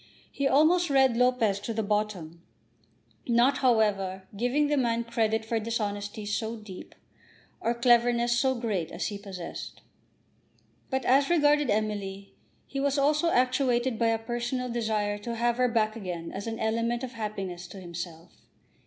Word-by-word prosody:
He 280 - 0
almost 325 +5 +4
read 265 -3 +4
Lopez 240 -5 +2
to 220 +2 -5
the 220 - 0
bottom, 200 -6 -2 0.9
not, 240 +4 +3
however, 205 -6 +1
giving 245 +7 +1
the 295 0 +1
man 235 -3 +1
credit 225 -2 0
for 225 0 0
dishonesty 210 -2 -3
so 220 +2 -2
deep 210 -4 -11 0.6
or 235 +1 0
cleverness 240 0 +3
so 265 -1 +2
great 210 -9 -2
as - - -3
he 205 -1 -6
possessed. 190 -4 -8 1.1
But 265 -2 -1
as 275 +2 +4
regarded 295 -4 +3
Emily, 205 -2 -2 0.3
he 275 - -5
was 280 0 +1
also 300 +4 +3
actuated 255 -3 +1
by 230 - +3
a 225 0 +2
personal 240 +2 -3
desire 215 -3 -1
to 235 +3 -5
have 235 +1 +1
her 250 0 +3
back 220 -2 +1
again 180 -6 -5
as 200 +3 -6
an 225 0 -3
element 230 +2 -1
of 255 - -4
happiness 195 -6 -5
to 190 +2 -10
himself. 170 -1 -8
230 Hz, 155 wpm, -28 LUFS, 205-250 Hz, 1.1 s, almost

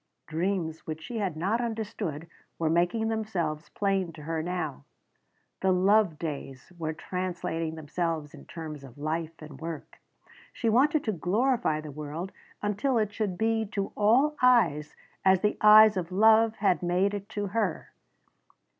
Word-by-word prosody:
Dreams 165 -1 -2
which 160 0 -5
she 235 +4 -5
had 185 -6 -2
not 200 +8 0
understood 215 -9 -4 0.3
were 160 -1 0
making 175 +7 +1
themselves 190 -8 -2
plain 195 -3 0
to 155 -2 -11
her 160 +1 -2
now. 175 - -4 0.8
The 190 - +2
love 190 -2 +3
days 140 -1 -6
were 160 -2 -3
translating 165 -2 -3
themselves 160 -1 -3
in - - -12
terms 155 -4 -7
of 130 -2 -13
life 160 +2 -3
and 150 -2 -11
work. 165 -2 -7 0.5
She 230 - -1
wanted 285 +6 +3
to 220 - 0
glorify 205 - +1
the 155 -1 -8
world 155 +6 -6 0.3
until 210 +5 0
it 215 -2 0
should 205 -4 -2
be 225 0 +1
to 200 -1 -2
all 250 +9 +3
eyes 175 - +3 0.3
as 190 -1 +4
the 210 - +1
eyes 215 0 +8
of 180 -1 -3
love 220 +3 +5
had 190 -6 +1
made 180 +3 +1
it 205 0 -5
to 205 - 0
her. 210 -7 -1
185 Hz, 155 wpm, -28 LUFS, 160-215 Hz, 0.8 s, eyes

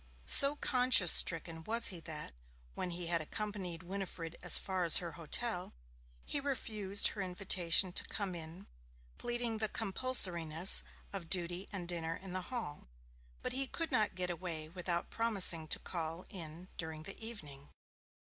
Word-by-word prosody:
So 280 - +7
conscience 250 - +4
stricken 165 -1 +4
was 230 +1 0
he 180 - -8
that, 155 - -9 0.4
when 180 - -6
he 175 0 -6
had 170 -1 -1
accompanied 185 -1 -7
Winifred 175 -3 -7
as 180 - +8
far 190 -2 -4
as 170 - +8
her 170 -2 -4
hotel, 175 +5 -4 0.5
he 290 - -3
refused 215 -8 -1
her 205 - -8
invitation 185 -1 +2
to - - +1
come 200 -3 -6
in, 170 +3 -11 0.5
pleading 240 -2 -4
the 215 -1 -1
compulsoriness 185 -7 +5 0.3
of 180 -4 -8
duty 180 +1 -1
and 185 -4 -7
dinner 165 -2 -4
in 190 0 -11
Hall. 185 - -6 0.6
But - - -3
he 270 +1 -1
could 330 +5 -5
not 215 -3 0
get 180 -1 -2
away 165 -3 -5
without 175 0 -3
promising 195 -8 0
to - - +1
call 165 0 -6
in 170 -1 -10
during 160 -1 -6
the 190 - -7
evening. 145 -12 -9
180 Hz, 150 wpm, -32 LUFS, 165-210 Hz, 0.6 s, as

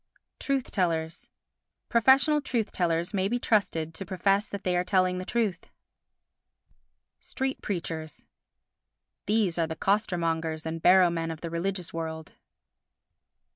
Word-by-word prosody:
Truth 275 -2 -1
tellers 165 -4 -1 0.6
Professional 270 +6 +4
truth 235 -6 -2
tellers 170 +1 0
may 190 -1 +1
be 240 - 0
trusted 165 -9 0
to 180 - -5
profess 195 +3 +1
that 200 -1 -7
they 180 -1 0
are 175 - +2
telling 185 -1 +2
the 185 - -5
truth. 210 -7 -1 1.5
Street 265 0 -3
Preachers 165 -5 -5 1.0
These 205 -5 +1
are 165 - +2
the 160 - -5
costermongers 165 -5 0
and 160 0 -4
barrow 180 0 +6
men 165 -1 -2
of 160 -1 -6
the 170 - -5
religious 180 +1 -3
world. 160 -1 -5
180 Hz, 130 wpm, -28 LUFS, 165-205 Hz, 1.5 s, barrow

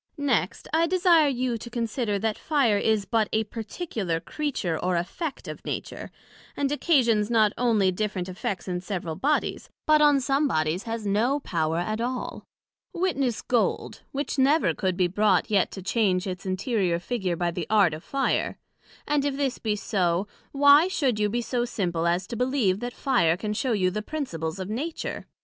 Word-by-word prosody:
Next, 250 -10 0
I 330 +1 +3
desire 345 -3 +4
you 250 -3 -1
to 235 - -8
consider, 230 -2 -1
that 215 +1 -1
Fire 265 -10 +2
is 215 -2 +1
but 220 -1 +1
a 220 - +1
particular 215 - -4
Creature, 185 - -3
or 180 0 +1
effect 270 - -4
of - - -7
Nature, - - -5 0.5
and 280 -1 0
occasions 240 - +2
not 220 -3 +3
onely 220 -6 +2
different 190 -1 -2
effects 185 +1 -4
in 180 -1 -2
several 180 -3 -4
Bodies, 295 - -1 0.2
but 305 0 +5
on 290 -2 +5
some 275 +3 +1
Bodies 155 - 0
has 225 -1 -3
no 225 +8 +1
power 160 - -1
at 215 +6 -2
all; 250 +1 -4 0.5
witness 280 - -1
Gold, 240 -2 0
which 280 0 -3
never 290 +5 +4
could 185 -2 -1
be 185 - +3
brought 205 +4 +2
yet 200 -3 +3
to 190 - -7
change 190 -2 +1
its 185 0 -5
interior 185 -2 0
figure 185 -1 -2
by 175 0 -1
the 170 -1 -4
art 205 -6 +4
of 155 - -7
Fire; 275 -1 -1 0.5
and 295 -1 +2
if 280 -1 -1
this 275 -3 -1
be 215 -2 -1
so, 190 -3 0 0.2
Why 285 +4 +6
should 270 - 0
you 210 0 +2
be 240 +3 -1
so 240 +1 -1
simple 175 -8 -1
as 175 +2 +1
to 235 - -6
believe 250 -6 +1
that 245 +1 -4
Fire 205 - +2
can 210 +2 -3
shew 240 +2 0
you 185 -2 +1
the 210 +3 -3
Principles 190 - -4
of 185 -1 -5
Nature? 280 +10 -4
220 Hz, 180 wpm, -26 LUFS, 185-270 Hz, 0.5 s, Why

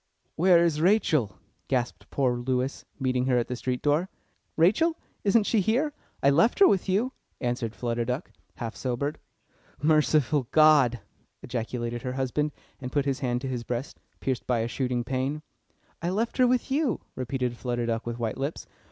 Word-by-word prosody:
"Where 175 0 +5
is 155 -3 0
Rachel?" 160 - +2 0.3
gasped 125 -2 -2
poor 130 -3 +1
Lewis, 125 +2 -2
meeting 130 -1 0
her 125 -2 +3
at 120 - 0
the 125 - -3
street 125 0 -3
door. 150 +6 +2 0.5
"Rachel! 220 - +3 0.3
isn't 210 +2 +4
she 220 +1 +2
here? 260 - +1 0.3
I 140 - +6
left 170 - +3
her 395 - +8
with 195 -1 +1
you," 225 +8 +1 0.3
answered 120 -2 -2
Flutter 120 0 -1
Duck, 125 +4 -3 0.2
half 115 -2 -5
sobered. 135 +4 -2 0.6
"Merciful 150 -3 +3
God!" 145 -7 +5 0.4
ejaculated 120 0 -3
her 125 +1 -3
husband, 135 +3 -1 0.3
and 125 -1 -6
put 145 0 +1
his 135 -2 0
hand 125 -2 -1
to 135 - -4
his 125 -2 -3
breast, 125 +3 -4 0.2
pierced 130 -2 -2
by 120 -2 +2
a 115 - -1
shooting 125 -1 -1
pain. 135 +4 -2 0.6
"I 170 - -1
left 220 +5 -1
her 255 -1 +5
with 250 +1 +1
you," 275 - +1
repeated 125 -1 -2
Flutter 120 -1 -2
Duck 115 -1 -1
with 120 0 -3
white 115 +1 -3
lips. 140 +4 -3
135 Hz, 170 wpm, -27 LUFS, 120-165 Hz, 0.6 s, her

